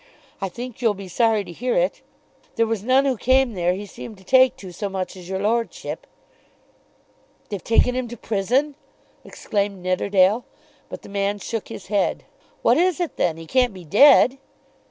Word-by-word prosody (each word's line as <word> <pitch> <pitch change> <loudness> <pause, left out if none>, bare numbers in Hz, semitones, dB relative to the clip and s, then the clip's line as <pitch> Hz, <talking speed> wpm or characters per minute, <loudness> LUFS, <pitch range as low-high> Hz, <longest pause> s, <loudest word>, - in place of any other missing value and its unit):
I 195 - -2
think 240 +5 -8
you'll 225 -4 +2
be 195 -1 -9
sorry 220 +2 +2
to 180 - -10
hear 245 +9 -2
it. - - 0 0.5
There 230 - +2
was 225 -3 -2
none 260 +5 +3
who 265 -2 +1
came 260 +1 +2
there 180 -1 0
he 205 +2 -6
seemed 210 +2 -10
to 190 - -18
take 260 +5 +5
to 190 -2 -10
so 200 +4 -4
much 190 -1 -4
as 180 -1 -11
your 190 - -2
lordship." 230 - -2 1.4
"They've 200 -3 -5
taken 230 +2 +3
him 255 -1 -2
to 240 +1 -9
prison!" 245 +9 0 0.5
exclaimed 200 -3 -3
Nidderdale. 190 +4 +2 0.5
But - - -8
the - - -12
man 200 0 -1
shook 225 +1 -5
his 185 - -9
head. 205 -1 0 0.4
"What - - +4
is 360 0 +2
it 350 -3 -3
then? 165 -2 0
He 165 - -9
can't 250 +2 +1
be 180 -2 -11
dead." 265 - +6
210 Hz, 180 wpm, -22 LUFS, 190-250 Hz, 1.4 s, dead